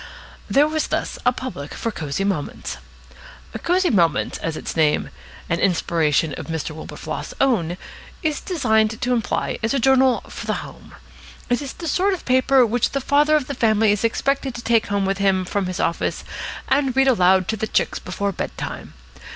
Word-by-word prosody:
There 290 +2 +4
was 310 0 -1
thus - - -2
a - - +7
public 245 - -6
for 230 - -2
Cosy 150 0 -3
Moments. 190 -7 -3 0.8
Cosy 360 +1 +2
Moments, 170 -7 +2
as 160 -1 -3
its - - -5
name 155 -2 +2 0.4
(an 170 - 0
inspiration 165 -4 +1
of - - -7
Mr. 160 -1 -3
Wilberfloss's 155 +1 -6
own) 185 -11 +1 0.5
is 310 -2 0
designed 220 - +1
to 250 0 0
imply, 230 -3 -1
is 225 +5 0
a - - +2
journal 265 0 +4
for - - -8
the - - -2
home. - - -13 0.6
It 245 - +2
is 275 -2 -6
the 335 - -7
sort 380 +5 +2
of 355 - -12
paper 260 0 +4
which 235 +1 0
the 275 - +1
father 295 +3 +3
of 300 -4 +1
the 280 - -4
family 220 -4 +3
is 205 +1 0
expected 270 +3 0
to 240 - -7
take 230 -1 +2
home 200 -1 0
with 195 0 -1
him 190 -2 +2
from 195 +1 -1
his 185 - -4
office 170 - -1 0.4
and 270 -1 +1
read 270 0 +4
aloud 185 -6 +4
to 220 - +1
the 220 +1 -3
chicks - - 0
before 200 +2 -3
bed - - -5
time. - - -6
225 Hz, 185 wpm, -22 LUFS, 185-270 Hz, 0.8 s, a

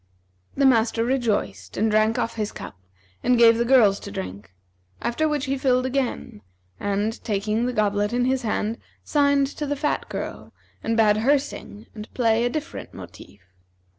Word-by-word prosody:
The 275 - +2
master 230 -2 +3
rejoiced 240 -4 -1
and 220 0 +1
drank 215 +1 +2
off 230 - -1
his 215 -2 -3
cup - - -9 0.5
and 250 0 +3
gave 230 -1 +6
the - - +3
girls 230 -6 +5
to - - -9
drink; 95 +1 -7 0.5
after 310 +6 0
which 295 -2 -1
he 270 0 -2
filled 255 -1 +2
again; 260 - -3 0.4
and, 205 +2 -2
taking 215 +2 -1
the - - -1
goblet 205 -2 0
in 245 +1 +1
his 260 0 +1
hand, 220 -1 -2 0.2
signed 285 -1 +3
to 290 +2 -5
the 290 - -1
fat 295 +1 -2
girl - - -6 0.3
and 225 0 0
bade 210 -2 +4
her 270 +7 +4
sing 225 -6 -8
and 210 -1 -9
play 230 -2 +2
a - - +1
different 310 +5 -6
motive. 100 - -12
230 Hz, 170 wpm, -24 LUFS, 215-265 Hz, 0.5 s, gave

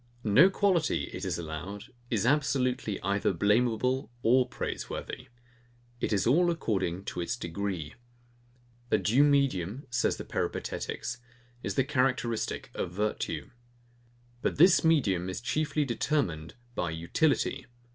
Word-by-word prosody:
No 125 - +6
quality, 190 -5 +1
it - - -5
is - - -1
allowed, 85 +5 -6 0.3
is 110 -2 0
absolutely 130 -6 +1
either 100 +1 +1
blameable 115 +6 +1
or 125 +2 +4
praiseworthy. 125 - -5 0.7
It - - -1
is 100 -3 +2
all 170 +9 +4
according 95 - -1
to 90 - -4
its 115 +7 -2
degree. 85 -4 -4 1.0
A - - +4
due 125 +7 +3
medium, 135 - +1
says 120 0 +1
the - - -7
Peripatetics, 125 +1 -3 0.4
is - - -3
the 135 - +3
characteristic 125 -4 -1
of - - -3
virtue. 105 +4 -2 0.9
But - - 0
this 175 +5 +6
medium 100 - +2
is 95 - -4
chiefly 155 -1 0
determined 115 - -1 0.2
by 90 -7 -1
utility. 85 - 0
115 Hz, 125 wpm, -29 LUFS, 95-140 Hz, 1.0 s, No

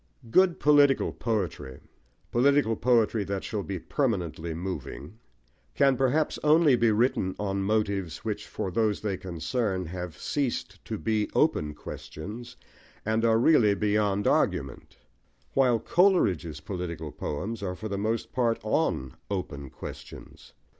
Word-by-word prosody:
Good 185 +4 +4
political 145 -2 +4
poetry 90 - -3 0.5
political 130 -2 +3
poetry 115 -3 +2
that 95 0 -3
shall 105 -3 -3
be 95 -1 -4
permanently 85 - -2
moving 90 +1 -6 0.6
can, 135 -1 +4
perhaps, 135 +4 +1
only 150 -2 +5
be 115 -1 +3
written 105 -4 +1
on 100 -1 -2
motives 100 -4 -1
which, - - -3
for 95 - -4
those 110 0 +1
they 105 -3 -1
concern, 95 +3 -2
have 90 -2 -6
ceased 140 -4 -3
to - - -4
be 105 +5 0
open 75 -1 +2
questions, 105 +11 -8 0.5
and 110 +1 +1
are 115 -1 +4
really 115 -5 +5
beyond 105 -1 +1
argument; 70 -2 0 0.6
while 130 -3 +4
Coleridge's 110 - +2
political 85 -3 -5
poems 100 +12 -4
are 90 -2 -3
for 110 +4 -6
the 100 - -3
most 115 +2 -2
part 120 -3 +1
on 65 -1 0
open 70 -8 -4
questions. - - -10
105 Hz, 130 wpm, -27 LUFS, 90-120 Hz, 0.6 s, only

